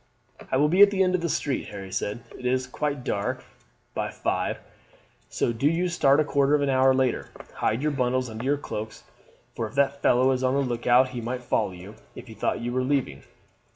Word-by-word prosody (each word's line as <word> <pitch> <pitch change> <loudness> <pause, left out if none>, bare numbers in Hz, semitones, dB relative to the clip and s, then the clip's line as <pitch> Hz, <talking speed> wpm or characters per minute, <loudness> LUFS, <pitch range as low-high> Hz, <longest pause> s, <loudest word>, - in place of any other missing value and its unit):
"I 130 - +2
will 145 +2 +4
be 180 +6 +3
at 205 - +10
the 195 -1 +2
end 185 -1 +1
of 185 - +1
the 170 - -1
street," 140 -2 -2
Harry 95 -2 -8
said. 105 +5 -3
"It - - -12
is 130 0 +1
quite 140 +1 -3
dark 100 -3 -2 0.5
by - - -2
five, - - -2 0.7
so 120 - -1
do 115 +5 +1
you 170 +4 +1
start 145 -5 +3
a - - +4
quarter 140 0 +2
of 145 - +1
an 140 - 0
hour 130 0 +4
later; 130 -2 0 0.2
hide 115 +6 -1
your 150 - +1
bundles 130 -2 0
under 110 0 -7
your 140 +2 +1
cloaks, 110 -5 -6 0.5
for 115 - -2
if 105 - -14
that 140 0 +1
fellow 130 +2 +4
is 130 0 -1
on 130 +1 +2
the 140 - +2
look 120 -3 -3
out 125 +2 +5
he 125 -2 -5
might 125 +2 -4
follow 115 -4 0
you 90 +3 -11 0.2
if - - -9
he 115 - -11
thought 110 - -2
you 120 +1 -3
were 130 - +1
leaving. 130 - -1
130 Hz, 225 wpm, -25 LUFS, 120-140 Hz, 0.7 s, at